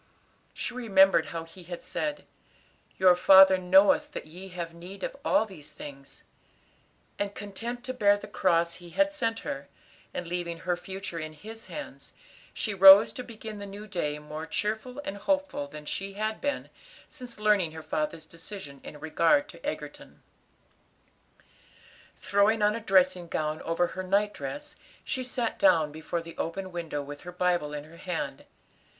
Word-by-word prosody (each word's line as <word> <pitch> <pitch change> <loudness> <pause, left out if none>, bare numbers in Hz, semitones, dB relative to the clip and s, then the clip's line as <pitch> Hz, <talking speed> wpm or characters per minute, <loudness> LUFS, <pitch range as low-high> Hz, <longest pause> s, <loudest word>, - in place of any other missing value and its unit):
She - - -3
remembered 195 -6 +4
how 165 -1 -5
He 165 +3 -13
had 175 0 -7
said, 295 -1 -3 0.7
"Your 185 -1 +6
Father 190 +1 +8
knoweth 190 +2 +4
that - - -5
ye 180 +5 -10
have 170 -3 -6
need 180 +3 -10
of - - -3
all 290 -6 +3
these 160 -8 -11
things," 140 -2 -11 1.0
and, 205 0 -2
content 230 +4 -5
to 255 0 -4
bear 205 -5 +4
the - - -9
cross 170 -2 +1
He 175 -1 -12
had 295 - +2
sent 230 -6 -1
her, 140 +1 -5 0.4
and 180 - -4
leave 170 -1 -4
her 180 0 0
future 190 -1 -6
in 155 -1 -6
His 220 +8 -10
hands, 295 -1 -8 0.4
she 215 - -2
rose 195 +2 +9
to 250 - -6
begin 220 -3 -8
the 200 - -7
new 200 +2 -8
day 170 -7 -2
more 150 +2 -7
cheerful 220 - -2
and 200 - -4
hopeful 285 - -1
than 150 +1 -10
she 195 +5 -4
had 215 +2 -3
been 285 0 -2 0.4
since 250 -2 -11
learning 210 -6 +2
her 160 0 -8
father's 155 +1 -2
decision 165 -4 -9
in 150 - -9
regard 170 - +3
to - - -13
Egerton. - - -6 2.0
Throwing 210 +2 +3
on 210 0 +4
a 230 - -3
dressing 185 -4 +3
gown 155 -1 -2
over 165 +1 +1
her 185 - -5
night 200 +3 +1
dress, 295 +1 -6 0.3
she 260 - -2
sat 245 -2 -2
down 160 - +4
before 160 +2 -4
the 165 0 -10
open 185 +3 -3
window 165 -4 -4
with 145 +1 -9
her 180 - -8
Bible 175 -4 0
in 150 -1 -5
her 160 +2 -15
hand. 180 -1 -4
190 Hz, 165 wpm, -28 LUFS, 165-215 Hz, 2.0 s, rose